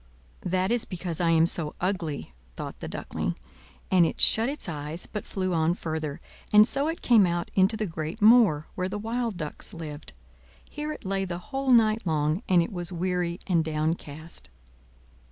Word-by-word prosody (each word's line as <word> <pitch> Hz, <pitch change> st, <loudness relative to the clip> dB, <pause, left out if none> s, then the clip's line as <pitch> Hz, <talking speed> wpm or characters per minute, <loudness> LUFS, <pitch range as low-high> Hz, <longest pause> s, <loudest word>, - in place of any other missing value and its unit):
"That 185 Hz, +3 st, +1 dB
is 240 Hz, -1 st, +1 dB
because 175 Hz, -2 st, -4 dB
I 170 Hz, -, +3 dB
am 165 Hz, 0 st, +5 dB
so 165 Hz, -3 st, 0 dB
ugly!" 170 Hz, -, -2 dB, 0.2 s
thought -, -, -7 dB
the -, -, -6 dB
Duckling; -, -, -3 dB, 0.6 s
and 185 Hz, -2 st, +6 dB
it 165 Hz, -, -1 dB
shut 225 Hz, +3 st, +4 dB
its 290 Hz, -5 st, -5 dB
eyes, 155 Hz, +1 st, -5 dB
but 210 Hz, -, -6 dB
flew 185 Hz, -2 st, -2 dB
on 165 Hz, +1 st, +2 dB
further; 155 Hz, -4 st, -4 dB, 0.3 s
and 210 Hz, +1 st, +8 dB
so 280 Hz, +3 st, +1 dB
it 325 Hz, +1 st, -4 dB
came 220 Hz, -6 st, +6 dB
out 175 Hz, 0 st, -2 dB
into 195 Hz, +3 st, +3 dB
the 215 Hz, -, -1 dB
great 160 Hz, +2 st, -5 dB
moor, 210 Hz, -9 st, +6 dB
where 185 Hz, 0 st, -2 dB
the 205 Hz, -, -4 dB
wild 225 Hz, -1 st, -2 dB
ducks 155 Hz, 0 st, -6 dB
lived. 150 Hz, -, -8 dB, 0.5 s
Here 300 Hz, +1 st, -5 dB
it 305 Hz, -, -8 dB
lay 195 Hz, 0 st, 0 dB
the 175 Hz, -2 st, -4 dB
whole 270 Hz, +7 st, -4 dB
night 225 Hz, -4 st, +4 dB
long; 155 Hz, +3 st, +1 dB
and 180 Hz, -2 st, +5 dB
it 185 Hz, -, -6 dB
was 175 Hz, -1 st, -4 dB
weary 180 Hz, 0 st, -1 dB
and 170 Hz, -4 st, +2 dB
downcast. 155 Hz, 0 st, -4 dB
180 Hz, 180 wpm, -27 LUFS, 160-215 Hz, 0.6 s, and